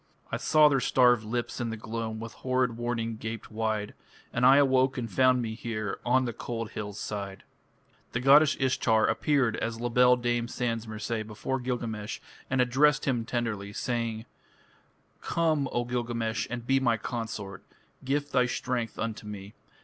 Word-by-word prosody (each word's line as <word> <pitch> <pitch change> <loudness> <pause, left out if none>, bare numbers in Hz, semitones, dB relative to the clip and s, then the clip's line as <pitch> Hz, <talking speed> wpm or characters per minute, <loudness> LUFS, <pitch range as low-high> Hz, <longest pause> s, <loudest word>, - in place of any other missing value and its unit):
I - - 0
saw 155 -1 +5
their 140 -2 +3
starved 125 -2 +4
lips 120 +3 -3
in 120 - -1
the 110 - -4
gloam, 110 0 -4
With 115 0 -7
horrid 130 -2 0
warning 115 -1 -2
gaped 110 +1 -6
wide; 110 -1 -2 0.4
And 125 +2 +4
I 135 - +8
awoke 130 -1 +3
and 120 -2 -2
found 130 +3 +3
me 110 -1 -3
here 110 -2 -4
On 130 +1 +3
the 120 - -3
cold 115 -1 -5
hill's 105 -2 -6
side. 100 -2 -5 0.7
The 120 - 0
goddess 140 +3 +6
Ishtar 115 -4 +2
appeared 140 -7 +1
as 115 0 -3
"La 120 +1 -2
Belle 125 +1 +5
Dame 120 -1 0
Sans 115 -2 -2
Merci" 110 +1 -3
before 110 +5 -3
Gilgamesh 115 -3 -4 0.3
and 130 -1 +2
addressed 135 +4 +3
him 120 -4 0
tenderly, 110 -5 -3
saying: 115 -1 -2 1.0
"Come, 155 -5 +1
O 120 - 0
Gilgamesh, 115 -3 -2
and 120 0 -5
be 135 +2 +3
my 120 -3 +2
consort. 105 -4 -5 0.4
Gift 145 +2 -1
thy 125 -2 +3
strength 120 -1 -2
unto 110 -1 -4
me. 100 -1 -8
120 Hz, 165 wpm, -28 LUFS, 110-130 Hz, 1.0 s, I